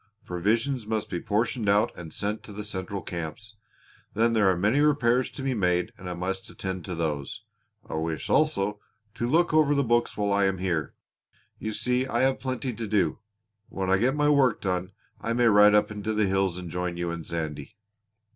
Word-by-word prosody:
Provisions 110 +7 0
must 110 -1 -2
be 90 - -1
portioned 110 +2 0
out 105 +3 +3
and 80 -2 -9
sent 105 +5 -2
to - - -11
the 105 +1 -6
central 100 -1 -5
camps. 90 +6 -6 0.6
Then 115 +2 +3
there 105 -4 +4
are 90 - +2
many 105 +10 +2
repairs 130 -4 +3
to 135 - -8
be 135 -1 0
made 90 -5 +1
and 90 -1 -8
I 90 - -4
must 95 +2 -3
attend 95 -2 -5
to 90 - -4
those. 75 -4 -3 0.4
I - - -7
wish, 80 0 -2
also, 105 -10 +1 0.3
to 120 +1 -2
look 165 +4 +3
over 150 -2 +4
the 140 - +2
books 120 -1 +1
while 100 -1 +1
I 100 0 +3
am 95 0 +1
here. 85 -5 -2 0.6
You 110 - -3
see 125 +3 0
I 120 -1 0
have 130 0 +2
plenty 130 -1 -3
to 115 0 -5
do. 95 -7 +1 0.5
When 95 -1 -2
I 95 - +5
get 130 +5 +2
my 150 0 +2
work 140 -5 +4
done 90 0 -2 0.3
I 115 - -1
may 120 +1 +2
ride 105 -1 +7
up 105 - +3
into 105 +1 -3
the 105 0 +3
hills 95 -2 +1
and 90 -2 -7
join 90 -1 -3
you 85 -1 -2
and 85 -1 -5
Sandy." 80 +3 -5
105 Hz, 205 wpm, -27 LUFS, 90-120 Hz, 0.6 s, ride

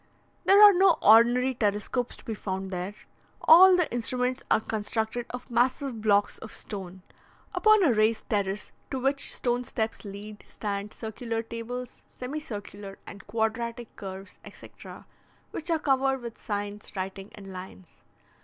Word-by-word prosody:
There 395 +1 +7
are 415 -1 +10
no 365 -2 +5
ordinary 240 +4 +6
telescopes 215 +2 -1
to - - -18
be 225 - -3
found 190 -2 -4
there: 185 +3 -4 0.4
all 370 +3 +8
the 355 - +2
instruments 250 +2 -1
are - - +4
constructed 220 +2 -3
of 250 0 -8
massive 250 0 0
blocks 205 -1 +2
of 220 - -9
stone. 190 -3 -7 0.5
Upon 430 -2 +5
a 280 -8 +4
raised 215 +1 +1
terrace, 200 -1 -1 0.2
to 265 - -3
which 275 +2 +1
stone 245 0 0
steps 220 -2 -3
lead, 205 +1 -9
stand 205 0 -4
circular 225 +1 -4
tables, 235 +2 -7
semicircular 210 -8 -7
and 200 - -11
quadratic 230 +2 -2
curves, 195 0 -9
etc. - - -12 0.5
which 330 +2 -5
are 330 - +3
covered 270 -2 +1
with 235 -1 -8
signs, 205 0 -5
writing, 195 +1 -5
and 195 -2 -10
lines. 185 -1 -11
225 Hz, 145 wpm, -27 LUFS, 205-250 Hz, 0.5 s, are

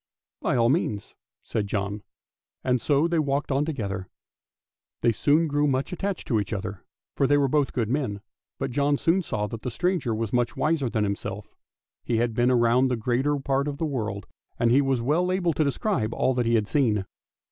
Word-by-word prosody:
" - - -68
" - - -66
By - - +1
all 115 -1 +3
means," 125 - -1 0.3
said 105 -2 -2
John, 100 0 -2 0.6
and 125 -2 +1
so 145 +5 +2
they 170 -1 +1
walked 140 -1 0
on 140 +2 +2
together. 100 - -3 0.9
They 120 - +4
soon 150 +8 +3
grew 145 0 +1
much 135 +4 -1
attached 195 +1 -3
to 115 -5 +3
each 100 +1 -3
other, 100 -2 -5 0.3
for 135 - +2
they 145 +1 +4
were 140 -1 +3
both 145 0 +1
good 115 -4 -1
men, 120 -6 -1 0.4
but - - -3
John 145 +2 +2
soon 170 +6 +2
saw 105 - -2
that 110 +1 -6
the 125 - -3
stranger 165 -4 0
was 110 -1 -3
much 120 -1 +1
wiser 155 -5 +1
than 110 -2 0
himself, 100 +1 -4 0.5
he 120 - 0
had 115 0 +1
been 120 +2 +3
round 120 +2 +4
the 125 - 0
greater 130 +6 +1
part 140 +1 0
of 145 -1 -3
the 160 - -1
world, 110 -9 -3 0.3
and 115 -1 +2
he 135 +3 +5
was 135 -3 +1
well 170 +8 +2
able 180 -3 +1
to 155 - +1
describe 135 - -1
all 130 - +2
that 125 -2 0
he 115 - +3
had 105 -2 +1
seen. 110 -9 +1
130 Hz, 210 wpm, -26 LUFS, 110-145 Hz, 0.9 s, he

